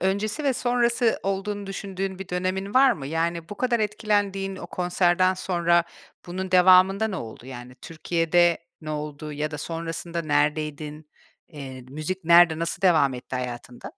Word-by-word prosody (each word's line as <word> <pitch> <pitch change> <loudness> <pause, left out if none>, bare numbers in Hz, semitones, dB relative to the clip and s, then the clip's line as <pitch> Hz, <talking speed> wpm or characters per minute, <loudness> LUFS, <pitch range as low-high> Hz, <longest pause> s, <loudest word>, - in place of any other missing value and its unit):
öncesi 205 - -1
ve 275 - +3
sonrası 245 -1 +1
olduğunu 195 +1 -3
düşündüğün 195 -1 -5
bir 195 - -8
dönemin 185 +3 -2
var 265 -1 +6
mı? 135 -3 -7
Yani 165 +2 -2
bu 205 - -6
kadar 245 -2 +1
etkilendiğin 205 -2 -1
o - - -8
konserden 180 +1 +2
sonra 175 -2 +1 0.4
bunun 185 +2 -5
devamında 185 +3 +5
ne 195 - -4
oldu? 115 -1 -8
Yani 125 -1 -9
Türkiye'de 165 +4 +1 0.2
ne 155 -1 -7
oldu 150 0 -5
ya 150 +1 -3
da 150 - -6
sonrasında 165 +1 -4
neredeydin? 150 0 -1 0.4
Eee, 135 -5 -9
müzik 155 +6 -5
nerede, 170 -1 +6
nasıl 170 +4 -3
devam 155 -7 +4
etti 125 +1 -6
hayatında? 125 -1 -6
175 Hz, 150 wpm, -25 LUFS, 150-195 Hz, 0.4 s, var